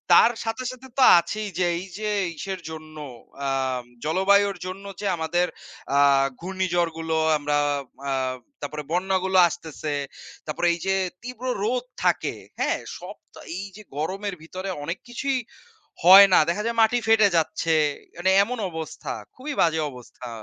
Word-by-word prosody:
তার 235 - +7
সাথে, 225 +3 -3
সাথে 255 +1 -12
তো 265 - +5 0.2
আছেই 210 +5 -4
যে, 180 - +3
এই 185 - -7
যে 215 -1 -2 0.3
ইসের 190 +3 -5
জন্য, 155 -1 -9 0.5
আম 130 -2 -1 0.2
জলবায়ুর 200 +5 +3
জন্য 190 +2 -7
যে, 210 - -5
আমাদের 175 +2 +1 0.5
আ - - +5 0.4
ঘূর্ণিঝড় 175 -2 0
গুলো 160 0 -1 0.2
আমরা 145 0 0 0.5
আ - - 0 0.5
তারপরে 150 +1 -5
বন্যা 190 +2 +1
গুলো 190 0 +2
আসতেছে। 160 -3 -5 0.5
তারপরে 165 +3 -1
এই 170 - -5
যে, 190 0 +2 0.3
তীব্র 250 +1 -8 0.2
রোদ 245 +3 0 0.2
থাকে, - - +1 0.2
হ্যাঁ? - - +1 0.2
সব - - -9 0.2
তো, - - -13 0.2
এই 190 - -4
যে 215 - -11 0.2
গরমের 195 +5 -3
ভিতরে 185 +4 -6
অনেক 165 +5 -3
কিছুই 265 +2 -1 0.7
হয় 195 +3 +10
না। - - +8
দেখা 205 +5 -1
যায়, 235 0 -2
মাটি 235 +2 +4
ফেটে 225 -2 +6
যাচ্ছে। 160 0 +1 0.4
মানে, 185 +2 +2
এমন 250 +4 -4
অবস্থা, 160 -2 -6 0.2
খুবই 290 +4 -5
বাজে 160 -1 +3
অবস্থা। 125 -1 -11
185 Hz, 155 wpm, -24 LUFS, 160-210 Hz, 0.7 s, হয়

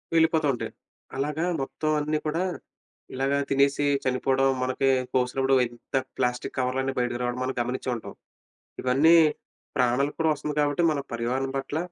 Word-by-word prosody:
వెళ్ళిపోతా 160 -1 +3
ఉంటాయి. 120 - -4 0.5
అలాగా 150 +4 -1 0.2
మొత్తం 155 +3 -3
అన్నీ 150 +1 0
కూడా, 165 +4 0 0.7
ఇలాగ 135 +1 0 0.2
తినేసి 140 +1 +2 0.2
చనిపోవడం 130 +1 +1 0.2
మనకి 130 +1 +1 0.2
కోసినప్పుడు 130 +1 +2
ఎంత 120 +2 -9 0.2
ప్లాస్టిక్ 125 -1 -1
కవర్లన్నీ 130 +1 0
బయటికి 120 0 -1
రావడం 125 +1 -2
మనం 130 +1 -1
గమనిచ్చే 125 +2 -3
ఉంటాం. 115 - -8 0.7
ఇవన్నీ 140 +6 +5 0.6
ప్రాణాలకు 125 +4 +1
కూడా 160 -1 +3
వస్తుంది 150 0 -4
కాబట్టి, 145 +3 +1
మన 150 -2 -1
పర్యావహణం 125 +3 -1
పట్ల, 135 +3 -2
135 Hz, 135 wpm, -26 LUFS, 125-145 Hz, 0.7 s, ఇవన్నీ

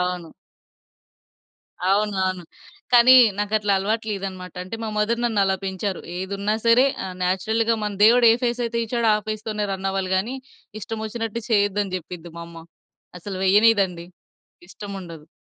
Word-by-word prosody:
అవును. 180 -2 -3 1.6
అవును. 205 +1 +1
అవును. 185 -1 -3 0.5
కానీ 245 +2 +8 0.2
నాకట్లా 205 0 0
అలవాటు 215 +4 -1
లేదన్నమాట. 190 -3 -6
అంటే 185 +5 -7
మా 220 - -3
మదర్ 230 +3 0
నన్ను 225 -4 0
అలా 190 0 +1
పెంచారు, 190 0 -3 0.2
"ఏదున్నా 200 +3 -2
సరే 235 +3 +5 0.2
ఆ - - -4 0.2
నేచురల్‌గా 220 +5 +1
మన 210 -1 -2
దేవుడు 240 +2 +6
ఏ - - +5
ఫేస్ 245 0 0
అయితే 235 0 -3
ఇచ్చాడో 235 -1 0
ఆ - - +1
ఫేస్ 215 0 -4
తోనే 210 -1 -2
రన్ 190 0 -4
అవ్వాలి 190 -1 -2
గానీ 230 +8 -2 0.5
ఇష్టం 225 +1 -5
ఒచ్చినట్టు 225 0 -4
చేయొద్దని" 205 -2 +1
చెప్పిద్ది 175 -1 -10
మా 170 - -6
అమ్మ. 165 -1 -12 0.5
అసలు 195 +2 -7
వెయ్యనీయదండి, 195 -4 +3 0.6
ఇష్టం 200 0 -8
ఉండదు. 165 -3 -11
205 Hz, 150 wpm, -22 LUFS, 185-225 Hz, 1.6 s, కానీ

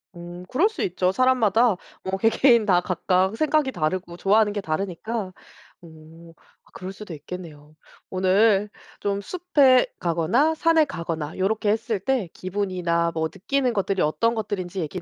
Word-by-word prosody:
음 175 +1 -9
그럴 335 - +2
수 440 - -4
있죠. 180 0 0
사람마다 235 -2 +3 0.3
뭐 190 0 -2
개개인 230 +1 +4
다 180 -3 +3
각각 185 +3 0
생각이 305 -1 +1
다르고 175 +1 -3
좋아하는 205 +2 +3
게 205 - -3
다르니까. 195 +4 -4 0.5
어. 165 0 -15 0.3
아 - - -24
그럴 190 +1 -7
수도 195 -3 -9
있겠네요. 155 -1 -10 0.3
오늘 195 +2 +2 0.3
좀 200 -1 -1
숲에 285 - +3
가거나 185 - +1
산에 325 -1 +3
가거나 165 - -5
요렇게 205 +3 0
했을 220 -1 0
때 230 -4 -1
기분이나 180 -3 -1
뭐 160 0 -1
느끼는 250 +5 -1
것들이 195 -2 -1
어떤 230 +10 +1
것들인지 195 -4 -4
얘기 170 +3 -5
195 Hz, 320 characters per minute, -24 LUFS, 175-230 Hz, 0.5 s, 개개인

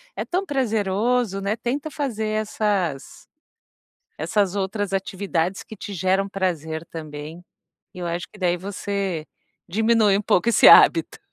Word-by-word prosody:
É - - -3
tão 370 +2 -1
prazeroso, 225 - 0
né. 200 +2 -1
Tenta 280 +7 -3
fazer 235 -8 -3
essas 200 -9 -2 0.9
essas 200 -3 0
outras 195 0 -2
atividades 190 -2 -2
que 220 - -10
te 200 0 -7
geram 190 +2 +1
prazer 165 -5 -3
também. 155 +1 -8 0.5
E 180 - -10
eu 175 - -3
acho 170 +1 -3
que 210 - -16
daí 180 -2 +2
você 195 -3 -3 0.4
diminui 215 +1 +3
um - - -1
pouco 200 +1 +1
esse - - +6
hábito. - - +6
195 Hz, 140 wpm, -23 LUFS, 180-215 Hz, 0.9 s, esse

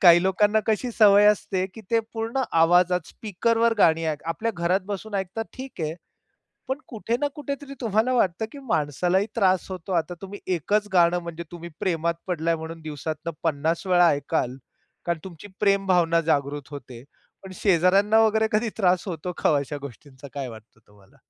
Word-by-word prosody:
काही 175 -1 +8
लोकांना 205 +3 +3
कशी 225 +3 0
सवय 205 -2 +6
असते, 195 -2 +2
की 225 - -9
ते 230 - +4 0.2
पूर्ण 225 +3 -2 0.2
आवाजात 180 +2 +4
स्पीकरवर 230 +3 0
गाणी 165 -3 +4
ऐक 150 -2 -2
आपल्या 220 +8 -2
घरात 175 +3 +1
बसून 205 +1 -5
ऐकतात, 195 +3 -2
ठीक 260 -6 -9
आहे, 155 0 -2 0.7
पण 265 +1 -1
कुठे 230 0 -2
ना 290 - +1
कुठे 285 -1 -4
तरी 275 -1 -9
तुम्हाला 225 +1 +1
वाटतं, 195 -4 +1
की 285 - -9
माणसालाही 175 +3 +1
त्रास 190 -4 +2
होतो. 185 0 -6
आता 175 0 0
तुम्ही 195 +1 -7 0.2
एकच 205 +6 0
गाणं 175 -1 +4
म्हणजे 170 0 -6
तुम्ही 170 0 -8
प्रेमात 170 -2 0
पडलाय 170 -2 0
म्हणून 165 +1 -8
दिवसातनं 155 +1 -5
पन्नास 160 +3 -1
वेळा 175 -2 +5
ऐकाल 130 -3 -1 0.5
कारण 170 -1 0
तुमची 185 +2 -10
प्रेम 200 -1 +2
भावना 170 -2 +3
जागृत 145 -1 -1
होते. 130 -4 -9 0.4
पण 190 -1 -10
शेजाऱ्यांना 195 +4 +3
वगैरे 220 0 +2
कधी 215 +2 +1
त्रास 180 -4 +2
होतो 180 +1 -4
का - - +4
ओ - - +3
अशा 145 +1 -5
गोष्टींचा? 140 0 -11
काय 135 -3 -4
वाटत 110 0 -13
तुम्हाला? 100 -2 -23
180 Hz, 170 wpm, -24 LUFS, 160-210 Hz, 0.7 s, काही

